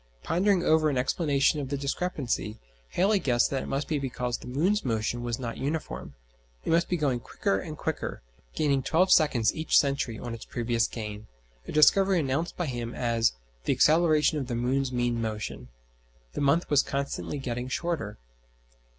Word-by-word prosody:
Pondering 185 +1 +2
over 155 -1 +4
an 140 - -1
explanation 140 +2 +2
of 135 -2 -4
the 140 - -1
discrepancy, 140 - -2 0.3
Halley 200 +3 +2
guessed 120 -8 +2
that 135 -1 -1
it - - -6
must 140 +2 -2
be 155 -3 0
because 125 -2 -3
the - - -11
moon's 175 +12 +1
motion 115 0 -1
was 120 -1 -2
not 120 -3 -5
uniform, 140 - -4 0.5
it - - 0
must 170 +1 +3
be 180 - +1
going 140 -6 0
quicker 95 -4 -1
and 155 +8 -7
quicker, 160 - -4 0.3
gaining 140 -3 +2
twelve 180 +7 +2
seconds 130 -10 +4
each 160 0 +2
century 140 -5 +1
on 120 0 -6
its 115 - -7
previous 115 -1 0
gain 105 -2 -7 0.4
a - - -5
discovery 190 +5 +5
announced 145 +3 -1
by 175 - -1
him 120 -4 -4
as 115 - +1 0.3
"the - - +2
acceleration 155 -1 +4
of 135 - -4
the 120 - -2
moon's 130 +3 0
mean 120 -1 0
motion." 110 -1 -4 0.7
The - - -3
month 145 +5 +3
was 145 -1 +6
constantly 140 +1 -3
getting 125 -2 -4
shorter. 140 -7 -3
135 Hz, 175 wpm, -28 LUFS, 120-155 Hz, 0.7 s, was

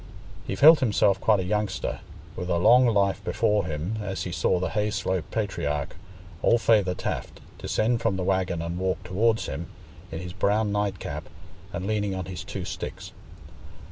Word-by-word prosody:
He 95 - -2
felt 155 +9 +8
himself 100 -5 +2
quite 105 -3 +3
a - - -2
youngster, 105 +1 -2 0.4
with 90 - -5
a 85 - +2
long 125 +8 +6
life 100 -4 +1
before 105 -3 +1
him, 80 +7 -3
as 95 -2 -3
he 90 - -4
saw 90 - +1
the 90 - -1
Hayslope 100 -5 -1
patriarch, 75 -9 -2 0.5
old 120 - +4
Feyther 100 -6 +3
Taft, - - -4 0.2
descend 115 +2 0
from 115 -4 +1
the 95 - -2
waggon 90 -3 0
and 85 +1 -4
walk 95 0 -1
towards 110 +4 +1
him, 80 +5 -5 0.4
in 80 - -4
his 90 +1 -6
brown 105 +2 +1
nightcap, 100 -3 -3 0.4
and 90 - -4
leaning 105 -2 -1
on 95 -1 -4
his 95 0 -6
two 95 -2 -6
sticks. - - -6
95 Hz, 170 wpm, -26 LUFS, 90-105 Hz, 0.5 s, felt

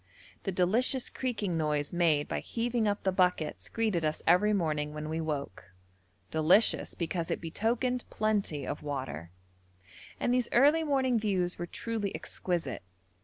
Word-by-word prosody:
The 195 - 0
delicious 225 +8 +1
creaking 210 -9 -2
noise 150 -1 -1
made 160 -4 +2
by - - -2
heaving 235 -1 -1
up 205 0 -1
the 190 - +2
buckets 180 -4 0
greeted 215 -7 0
us 155 0 -1
every 180 +5 +5
morning 150 -6 0
when 150 0 -5
we 160 +1 -2
woke, 145 -12 -4 0.7
delicious 160 +8 +3
because 170 0 -2
it - - -1
betokened 240 +8 -1
plenty 205 -10 0
of 145 - -4
water: 135 - -5 0.9
and 245 - +1
these 250 -1 +1
early 295 +6 +5
morning 265 -5 +2
views 185 -5 0
were 175 - -3
truly 220 0 -3
exquisite. 170 -9 -3
180 Hz, 145 wpm, -30 LUFS, 155-225 Hz, 0.9 s, every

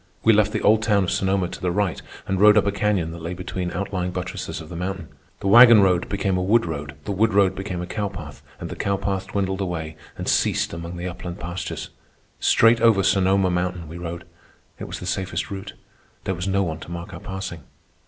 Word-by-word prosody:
We 115 - +6
left 105 0 +3
the 105 - -2
old 110 +1 +5
town 105 -3 +2
of 90 - -1
Sonoma 95 -1 +1
to - - -9
the 90 - 0
right 95 0 -1 0.2
and 95 -1 -1
rode 105 0 +7
up 105 - +4
a 100 - +2
canyon 100 -5 0
that 85 0 -8
lay 85 +2 -4
between 90 0 -4
outlying 90 0 -3
buttresses 90 +1 -5
of 80 - -10
the 90 - -7
mountain. 90 -1 -4 0.3
The - - -2
wagon 115 +1 +9
road 90 -2 +2
became 100 -2 0
a - - 0
wood 110 +5 +3
road, 75 -3 -5
the - - -3
wood 105 +2 +1
road 100 -2 +4
became 95 -2 -4
a - - -3
cow 105 +2 -3
path, 75 -7 -9 0.2
and - - -6
the - - -5
cow 100 0 -1
path 95 -1 -2
dwindled 95 0 -2
away 80 -4 -4 0.2
and - - -5
ceased - - +1
among 85 +1 -6
the 90 +1 -4
upland 90 +1 -7
pastures. 85 -1 -5 0.5
Straight 115 0 +4
over 110 -4 +5
Sonoma 95 -1 +3
Mountain 90 -1 -2
we 85 +3 -8
rode. 85 0 -6 0.6
It - - -5
was - - -6
the - - -7
safest 95 +1 -2
route. 100 +1 -6 0.5
There 95 - -1
was 90 +2 -4
no 100 0 +2
one 80 -3 -3
to - - -10
mark 85 +2 -7
our - - -7
passing. 95 -4 -6
95 Hz, 225 wpm, -23 LUFS, 85-100 Hz, 0.6 s, wagon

